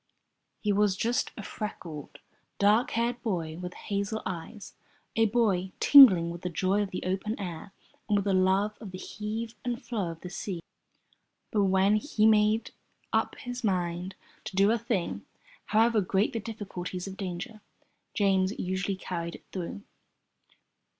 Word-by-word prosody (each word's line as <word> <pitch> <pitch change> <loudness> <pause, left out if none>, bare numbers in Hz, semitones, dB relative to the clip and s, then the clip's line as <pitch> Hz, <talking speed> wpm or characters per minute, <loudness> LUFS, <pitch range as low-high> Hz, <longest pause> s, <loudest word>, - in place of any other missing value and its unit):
He 210 -1 +1
was 200 -1 +2
just 235 +4 0
a 215 - -6
freckled, 170 -9 -7 0.4
dark 210 +4 +4
haired 240 +1 0
boy 170 -7 -2
with 180 0 -6
hazel 200 +1 -3
eyes, 190 +4 -6 0.4
a 225 0 +4
boy 200 -5 +1
tingling 190 -13 +8
with 170 0 -8
the 180 - -2
joy 185 +4 +1
of 205 - -2
the 185 - -5
open 195 +5 -2
air 180 -1 -6 0.4
and 205 - +4
with 200 - -1
the 200 - +2
love 190 +3 +2
of 210 - -7
the 185 - -7
heave 220 +4 -5
and 240 -1 -2
flow 205 -8 -3
of 165 -1 -8
the 180 - -7
sea. 185 -1 -4 0.9
But 205 -2 +3
when 190 +2 +4
he 215 -2 +1
made 215 +1 +4 0.4
up - - +1
his 245 -1 -6
mind 180 -2 -1 0.3
to - - -6
do 200 +2 +5
a 235 - +1
thing, 215 -6 -2 0.4
however 225 0 +3
great 195 +2 +1
the 230 - -1
difficulties 195 -5 -6
or - - -5
dangers, 190 +3 -6 0.6
James 195 -1 +2
usually 190 +1 -1
carried 170 -2 -5
it - - -14
through. 190 +2 -5
200 Hz, 155 wpm, -29 LUFS, 185-215 Hz, 0.9 s, tingling